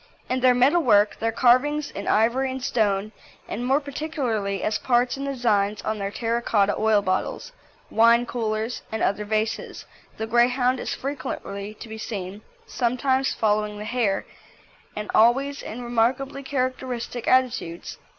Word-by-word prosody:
In 255 - +1
their 250 -1 +4
metal 275 +8 +4
work, 205 -7 +4
their 225 0 0
carvings 270 +6 +3
in 200 - -6
ivory 235 +5 +2
and 260 0 -5
stone, 215 -5 0 0.4
and 235 - -4
more 265 +3 +3
particularly 270 - -3
as 215 0 0
parts 245 0 +2
in 275 0 -5
the 275 - -2
designs 210 -5 +1
on 215 0 -2
their 200 0 -2
terra 230 +2 -1
cotta 205 -3 +2
oil 215 -2 +2
bottles, 185 - -2 0.4
wine 235 +2 +5
coolers, 225 -1 -3
and 220 - -2
other 200 +2 0
vases, 215 +1 -2 0.3
the 220 - -2
Greyhound 245 +2 +2
is - - -3
frequently 235 -7 -5
to 230 - -10
be 220 0 -8
seen, 200 -2 -5 0.2
sometimes 260 +2 0
following 210 -1 0
the 210 - -6
hare, 220 -4 0 0.7
and 210 0 -4
always 270 +5 +3
in 245 +3 -7
remarkably 245 +4 0
characteristic 255 -3 -3
attitudes. 250 -10 0
235 Hz, 150 wpm, -24 LUFS, 215-255 Hz, 0.7 s, wine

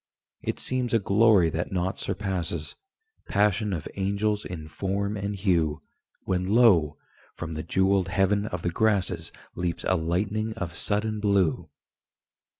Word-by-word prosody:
It - - -3
seems 125 -2 0
a - - +4
glory 100 -4 +4
that 85 +3 -3
nought 95 +1 -1
surpasses 85 -5 -3 0.5
Passion 105 +1 +2
of 80 -5 -3
angels 100 +2 0
in 80 -4 -6
form 100 +6 -2
and 100 0 -3
hue 85 -6 +1 0.4
When, 90 -1 -1
lo! 95 -9 +4 0.4
from 85 -1 -5
the 80 - -3
jewelled 95 +1 +2
heaven 100 +3 +1
of 90 -4 -5
the 85 - 0
grasses 95 -5 0 0.2
Leaps 85 -1 -3
a 95 - +3
lightning 100 +6 -1
of 95 -7 -4
sudden 105 +4 0
blue. 100 -5 +1
95 Hz, 140 wpm, -26 LUFS, 85-105 Hz, 0.5 s, a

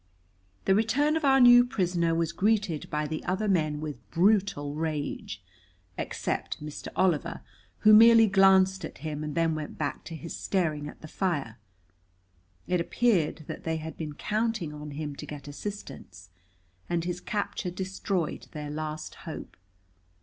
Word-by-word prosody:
The 190 - +4
return 270 +9 +2
of 320 - -1
our 270 -1 +5
new 245 -1 +9
prisoner 175 -8 0
was 165 0 0
greeted 200 -4 0
by 150 0 -1
the 155 +1 -4
other 190 +4 -1
men 155 -6 +1
with 145 -9 -7
brutal 180 - +2
rage, 150 - -4 0.5
except - - -3
Mr. 150 0 -7
Oliver, 170 -2 +1 0.4
who 215 0 +7
merely 225 +1 +8
glanced 190 -1 +4
at 160 - -7
him 155 -1 -3
and 150 -1 -4
then 165 -1 +2
went 155 -1 -5
back 145 -2 -3
to 165 - -7
his 165 +1 -7
staring 155 -6 -1
at - - -11
the 155 - -9
fire. 145 - -2 1.1
It 180 -1 +1
appeared 170 -7 +1
that - - -7
they 160 0 -1
had 160 0 -7
been 155 -2 -5
counting 215 -5 -1
on 150 0 -8
him 145 0 -5
to - - -7
get 145 -1 -8
assistance, 145 - -8 0.6
and 170 -1 0
his 180 0 -3
capture 205 -3 -3
destroyed 185 -2 -3
their 150 -1 -5
last 155 0 -5 0.2
hope. - - -8
170 Hz, 155 wpm, -28 LUFS, 150-200 Hz, 1.1 s, new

